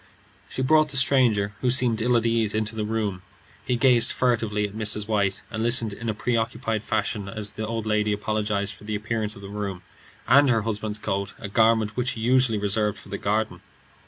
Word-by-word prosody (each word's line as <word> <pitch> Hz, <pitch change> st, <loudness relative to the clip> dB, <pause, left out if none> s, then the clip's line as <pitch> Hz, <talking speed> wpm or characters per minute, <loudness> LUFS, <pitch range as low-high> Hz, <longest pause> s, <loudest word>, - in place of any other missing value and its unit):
She 130 Hz, -, -3 dB
brought 155 Hz, +3 st, +4 dB
the 140 Hz, -, -2 dB
stranger, 120 Hz, -7 st, +3 dB
who 125 Hz, -, +1 dB
seemed 120 Hz, -3 st, +2 dB
ill 120 Hz, +1 st, +3 dB
at 115 Hz, -, 0 dB
ease, 115 Hz, -2 st, +1 dB
into 110 Hz, 0 st, -1 dB
the 110 Hz, -1 st, -2 dB
room. 105 Hz, -4 st, -2 dB, 0.4 s
He 125 Hz, -, 0 dB
gazed 120 Hz, -1 st, +5 dB
at -, -, -1 dB
her -, -, -13 dB
furtively, 115 Hz, -4 st, +1 dB
and 105 Hz, 0 st, -1 dB
listened 115 Hz, -3 st, +1 dB
in 115 Hz, +3 st, -5 dB
a 110 Hz, -, -2 dB
preoccupied 115 Hz, -1 st, -1 dB
fashion 105 Hz, -2 st, -2 dB
as 105 Hz, 0 st, -3 dB
the 110 Hz, 0 st, -5 dB
old 115 Hz, -1 st, -3 dB
lady 105 Hz, -1 st, +1 dB
apologized 105 Hz, -1 st, -1 dB
for 100 Hz, -, -16 dB
the 105 Hz, 0 st, -3 dB
appearance 110 Hz, 0 st, -2 dB
of 100 Hz, -, -12 dB
the -, -, -7 dB
room, 100 Hz, -3 st, -5 dB, 0.4 s
and 140 Hz, +2 st, +6 dB
her 115 Hz, -3 st, +2 dB
husband's 110 Hz, -1 st, -3 dB
coat, 100 Hz, -1 st, -3 dB
a -, -, -6 dB
garment 110 Hz, 0 st, +2 dB
which 125 Hz, +1 st, 0 dB
he 115 Hz, -, -7 dB
usually 125 Hz, -1 st, +3 dB
reserved 105 Hz, 0 st, 0 dB
for -, -, -14 dB
the 100 Hz, -, -5 dB
garden. 105 Hz, +1 st, -1 dB
110 Hz, 200 wpm, -24 LUFS, 105-115 Hz, 0.4 s, and